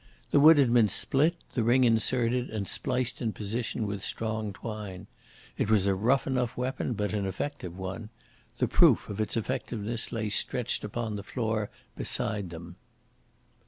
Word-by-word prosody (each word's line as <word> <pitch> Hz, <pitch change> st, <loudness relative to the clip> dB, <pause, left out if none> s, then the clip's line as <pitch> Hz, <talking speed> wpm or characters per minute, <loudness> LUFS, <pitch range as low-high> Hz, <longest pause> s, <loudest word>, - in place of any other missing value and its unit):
The 145 Hz, -, +5 dB
wood 155 Hz, +2 st, +8 dB
had 130 Hz, -4 st, +4 dB
been 115 Hz, -3 st, +6 dB
split, 140 Hz, -, +2 dB, 0.2 s
the 120 Hz, -, 0 dB
ring 120 Hz, +3 st, +4 dB
inserted 120 Hz, +1 st, +2 dB
and 105 Hz, -3 st, -4 dB
spliced 125 Hz, -1 st, -2 dB
in 115 Hz, -3 st, -1 dB
position 110 Hz, +2 st, -3 dB
with 100 Hz, -1 st, -4 dB
strong 110 Hz, -2 st, -2 dB
twine. 105 Hz, -2 st, -7 dB, 0.5 s
It -, -, +1 dB
was 105 Hz, -3 st, +4 dB
a 100 Hz, -, +3 dB
rough 120 Hz, +8 st, +2 dB
enough 125 Hz, -3 st, -1 dB
weapon, 125 Hz, 0 st, -2 dB
but 105 Hz, -1 st, -2 dB
an 100 Hz, -2 st, -1 dB
effective 95 Hz, -, -5 dB
one. 95 Hz, +3 st, -5 dB, 0.5 s
The -, -, +1 dB
proof -, -, +4 dB
of 105 Hz, +1 st, -3 dB
its 110 Hz, -, -1 dB
effectiveness 115 Hz, -2 st, -2 dB
lay 110 Hz, -2 st, -2 dB
stretched 115 Hz, +3 st, 0 dB
upon 110 Hz, 0 st, -3 dB
the 100 Hz, -, -6 dB
floor 110 Hz, -1 st, -2 dB, 0.3 s
beside 105 Hz, -4 st, -2 dB
them. 85 Hz, +1 st, -9 dB
110 Hz, 160 wpm, -29 LUFS, 100-125 Hz, 0.5 s, wood